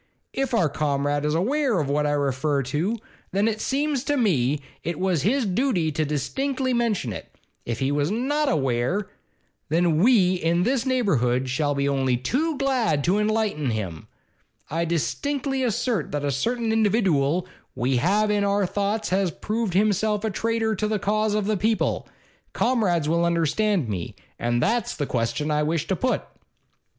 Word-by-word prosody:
If 270 -2 -1
our 180 -8 +3
Comrade 145 0 -1
is 150 +1 +1
aweer 250 - +1
of 150 - -1
what 150 +1 +1
I 145 - +1
refer 140 0 0
to, 160 - -1 0.4
then 200 +3 +2
it 220 -1 -1
seems 280 -1 0
to 290 -1 +1
me 150 - +2 0.2
it 170 -1 -3
was 185 -5 +1
his 245 - +1
dooty 195 - +1
to 155 +1 0
distinctly 255 - -1
mention 220 - 0
it. - - -10 0.3
If 115 -1 -2
he 135 0 0
was 145 +1 +1
not 275 +7 0
aweer, 135 - 0 0.6
then 165 0 +2
we 195 -3 +5
in 170 +1 +1
this 255 +3 0
neighbourhood 130 - +1
shall 145 +2 0
be 140 0 0
only 135 -3 +1
too 285 - -1
glad 250 - +1
to 190 +6 +2
enlighten 210 - 0
him. 95 -8 -4 0.6
I 165 +2 0
distinctly 270 - -1
assert 235 - -1
that 145 -1 -1
a 140 - 0
certain 230 - -1
individooal 185 -8 +2 0.3
we 125 +1 +1
all 145 - -1
have 210 +2 +2
in 205 -1 +1
our 200 0 +2
thoughts 205 +3 -1
has 190 0 +1
proved 215 +2 -3
himself 210 +1 +2
a 220 - 0
traitor 225 +2 0
to 215 - 0
the 215 0 0
cause 210 +1 0
of 210 -2 0
the 215 0 +1
people. 220 +4 0 0.4
Comrades 195 - +1
will 170 +2 +2
understand 170 - +1
me. 95 -5 -4 0.2
And 120 0 0
that's 235 -2 0
the 145 - -2
question 130 +5 -1
I 150 0 +2
wish 155 0 0
to 190 - 0
put. 255 +7 0
185 Hz, 170 wpm, -24 LUFS, 145-225 Hz, 0.6 s, we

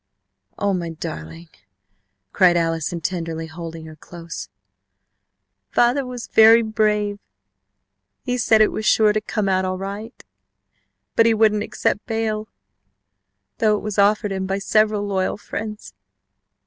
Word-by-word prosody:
"Oh, 200 -1 0
my 175 -2 -2
darling!" 165 +1 -8 0.8
cried 180 -2 +4
Allison, 165 0 -1
tenderly 165 -1 -3
holding 165 0 -8
her 155 -1 -11
close. 165 +2 -9 1.2
"Father 245 +4 +2
was 245 -2 -6
very 225 +1 +6
brave. 210 -2 0 1.0
He 250 - -1
said 220 -2 +4
it 215 - +4
was 220 - -4
sure 215 0 +4
to 215 - 0
come 210 -1 -2
out 190 -1 +1
all 185 0 -2
right, 200 +5 -7 0.9
but 230 - +5
he 225 - +3
wouldn't 215 -1 +3
accept 210 0 -2
bail, 220 -2 -2 1.1
though 215 -1 +3
it - - -5
was 210 -1 -3
offered 205 0 +3
him 190 -1 -3
by 195 +1 -1
several 215 +1 +1
loyal 190 -2 -1
friends. 210 +1 -7
205 Hz, 135 wpm, -21 LUFS, 175-215 Hz, 1.2 s, very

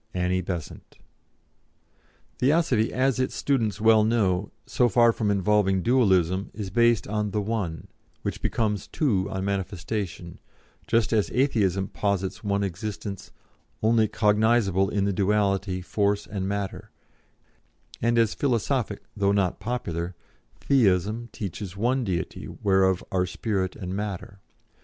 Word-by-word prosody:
"ANNIE 90 +1 +1
BESANT." 85 -4 -7 1.4
Theosophy, 130 -5 +2
as 130 0 +1
its 130 - -1
students 110 -8 0
well 110 0 +5
know, 105 -4 +1
so 125 -1 +2
far 120 +1 +5
from 110 -2 -1
involving 100 -1 +2
Dualism, 95 -7 +2
is 100 -3 -5
based 115 -2 +3
on 105 0 -1
the 105 - -1
One, 100 -7 -3 0.4
which - - -4
becomes 105 -3 -1
Two 100 -11 0
on 95 0 -3
manifestation, 95 -2 -4 0.5
just 115 0 +2
as 105 -2 +2
Atheism 100 -8 +1
posits 100 -1 -2
one 100 -1 0
existence, 100 +1 -5 0.5
only 110 0 +4
cognisable 105 -3 +2
in 100 -1 +1
the 100 - 0
duality 100 -1 +1
force 100 +1 0
and 95 -2 -4
matter, 100 -1 -4 1.1
and 115 +1 +2
as 115 -2 +3
philosophic 120 -4 -1
though 100 -1 +2
not 100 -3 +1
popular 95 -6 -3 0.5
Theism 110 -2 +2
teaches 100 -2 -6
one 125 +5 +1
Deity 95 -6 -3
whereof 95 -2 +1
are 90 -1 +1
spirit 95 0 -2
and 90 -3 -5
matter. 100 -1 -5
100 Hz, 125 wpm, -26 LUFS, 95-115 Hz, 1.4 s, well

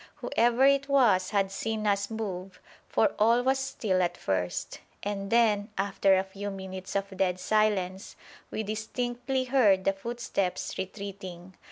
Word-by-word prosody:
Whoever 240 +3 +2
it 280 +1 +3
was 230 -10 +4
had 195 -2 +1
seen 220 +2 -3
us 200 -1 +1
move, 195 -4 -5 0.3
for 220 - +2
all 230 +3 +4
was 265 +1 +2
still 215 -8 0
at 175 -1 0
first, 90 -2 -2 0.2
and 200 -1 -3
then, 215 -3 +3
after 195 0 +3
a 190 - +1
few 195 +1 -6
minutes 190 -1 -7
of 195 0 -2
dead 185 -1 0
silence, 195 -2 0 0.3
we 220 - -3
distinctly 245 +4 -2
heard 235 -8 +4
the 195 - +2
footsteps 200 -3 -3
retreating. 190 -2 -7
200 Hz, 145 wpm, -28 LUFS, 190-230 Hz, 0.3 s, was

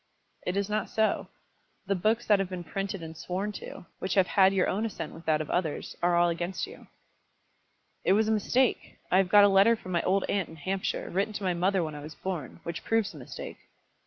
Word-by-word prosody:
"It 180 +2 0
is 200 -1 0
not 210 0 -1
so. 220 0 +1 0.6
The 200 - +1
books 215 +6 +1
that 205 -2 +4
have 195 -2 -1
been 180 -2 -5
printed 195 +1 -4
and 160 0 -8
sworn 185 +5 -3
to, 200 - -9
which 190 - -2
have 190 -2 +5
had 190 +1 +5
your 190 -2 +2
own 205 +4 0
assent 215 -8 -4
with 165 - -12
that 155 -1 +2
of 155 - -5
others, 165 -4 -2
are 175 0 +3
all 175 0 +4
against 175 +2 -2
you." 435 +4 -13 1.2
"It - - +4
was 215 +2 +3
a - - +2
mistake. 240 +4 +1
I 185 - +5
have 190 -1 +3
got 205 +1 +8
a - - +8
letter 200 +4 +5
from 185 -4 -9
my 170 -1 +2
old 195 +1 +2
aunt 195 -4 0
in 160 - -11
Hampshire, 185 +5 -3
written 200 +4 0
to 205 - -5
my 185 -1 +1
mother 185 +1 +1
when 155 -1 -4
I 150 - -7
was 150 +2 -9
born, 175 -8 -5
which 170 -1 -5
proves 225 -2 +1
the - - -11
mistake." - - -8
190 Hz, 230 wpm, -28 LUFS, 175-205 Hz, 1.2 s, got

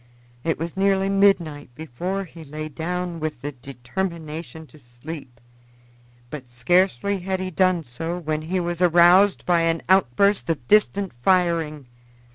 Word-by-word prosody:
It 165 - 0
was 165 +1 -5
nearly 195 0 +2
midnight 185 -8 +2
before 175 +6 -4
he 165 -2 -12
lay 155 +1 -7
down 175 +2 -4
with 155 -5 -4
the 145 - -3
determination 155 +3 -6
to 155 - -18
sleep, 120 +1 -10 0.9
but 130 -5 -8
scarcely 180 +8 +1
had 190 +1 -3
he 185 0 -4
done 185 -1 +2
so 165 +8 -5
when 155 -3 -3
he 180 +4 -2
was 175 0 -3
aroused 180 +3 +5
by 175 -2 +3
an 165 0 0
outburst 190 +3 +3
of 140 -7 -2
distant 200 -2 +2
firing. 165 -4 +1
165 Hz, 140 wpm, -23 LUFS, 150-185 Hz, 0.9 s, aroused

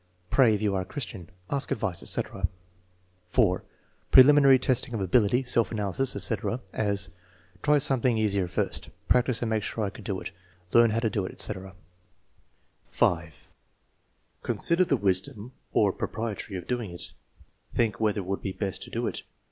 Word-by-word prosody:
"Pray, 120 -5 +5
if 105 - -4
you 105 -2 +1
are 95 - 0
a - - -5
Christian." 100 - -6 0.2
"Ask 140 0 -1
advice," 95 -6 -2
etc. 95 -2 -1 0.8
(4) 90 -3 +2 0.5
Preliminary 140 0 +8
testing 130 -1 0
of - - -2
ability, 105 +6 +2
self 120 -3 +1
analysis, 105 +4 -1
etc.; 115 +2 0
as: 100 -2 0 0.5
"Try 150 0 +4
something 130 -4 +1
easier 100 -4 +1
first." 90 - -2 0.2
"Practice 125 -1 +2
and 115 - -1
make 110 -1 +1
sure 110 +1 -3
I 100 - -2
could - - -12
do 95 -3 -3
it." - - -7 0.4
"Learn 115 0 +6
how 115 +2 0
to 115 - +1
do 100 - -1
it," - - -7
etc. 95 -2 -1 1.1
(5) 85 -2 -1 0.9
Consider 170 +2 +2
the 140 -5 +1
wisdom 100 +3 -1 0.2
or 100 -3 +3
propriety 110 -3 -4
of 90 -2 -5
doing 120 -5 -3
it: 85 0 -8 0.6
"Think 115 -3 0
whether 105 -2 +1
it - - -9
would 95 +1 -3
be 95 - -4
best 95 -2 -4
to - - -7
do - - -2
it." - - -3
110 Hz, 165 wpm, -27 LUFS, 95-125 Hz, 1.1 s, Preliminary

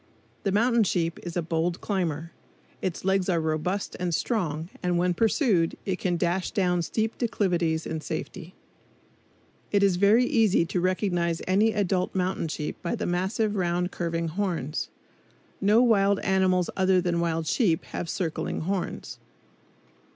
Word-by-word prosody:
The 195 - 0
mountain 235 +3 +3
sheep 170 -3 -1
is 175 0 -5
a 175 - 0
bold 165 +2 -1
climber. 170 -5 -2 0.5
Its 185 -1 -3
legs 190 -1 +2
are 170 -2 +2
robust 160 +5 -2
and 175 -2 0
strong, 165 -8 -1
and 180 -1 +1
when 180 +1 +2
pursued 210 - +2
it 190 -2 -2
can 175 -2 0
dash 175 +2 0
down 180 -5 +1
steep 220 +6 -2
declivities 175 -8 0
in 160 -1 -4
safety. 170 +3 -6 1.2
It 200 -1 +3
is 190 -3 +3
very 210 +6 +5
easy 220 -8 +3
to 175 +2 -2
recognize 175 -2 0
any 205 +4 +3
adult 190 -3 0
mountain 185 -2 0
sheep 150 -1 -5
by 170 - -2
the - - -3
massive 195 +5 0
round 180 -1 0
curving 165 -1 -2
horns. 170 -5 -2 0.7
No 210 +4 +5
wild 200 -4 +3
animals 185 -2 +2
other 190 -1 +3
than 175 -1 0
wild 165 -1 0
sheep 170 - +1
have 170 - -5
circling 165 -3 -2
horns. 185 +2 -3
180 Hz, 150 wpm, -26 LUFS, 170-200 Hz, 1.2 s, very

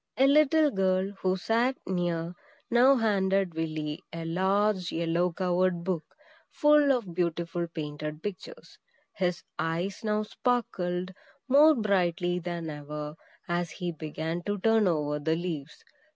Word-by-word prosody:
A 265 - +5
little 300 +1 +5
girl, 190 0 +1
who 185 0 +1
sat 235 +7 +1
near, 175 -2 -1 0.4
now 250 +3 +6
handed 195 -5 +1
Willy 155 -2 -3
a 165 0 -6
large 190 +2 +1
yellow 170 +2 0
covered 180 0 0
book, 175 -3 -1 0.5
full 295 -1 +4
of 230 -10 -1
beautiful 170 0 -1
painted 150 -1 -6
pictures. 210 - -8 0.3
His 180 -2 -1 0.2
eyes 170 +6 -2
now 215 0 0
sparkled 185 -7 -1 0.3
more 295 +4 +6
brightly 180 -5 +1
than 170 -1 -4
ever, 150 0 -6 0.3
as 175 0 -1
he 175 +2 -4
began 160 +2 -4
to 205 0 0
turn 225 +1 +3
over 150 -3 0
the 160 +2 0
leaves. 165 -4 -5
180 Hz, 130 wpm, -28 LUFS, 165-210 Hz, 0.5 s, now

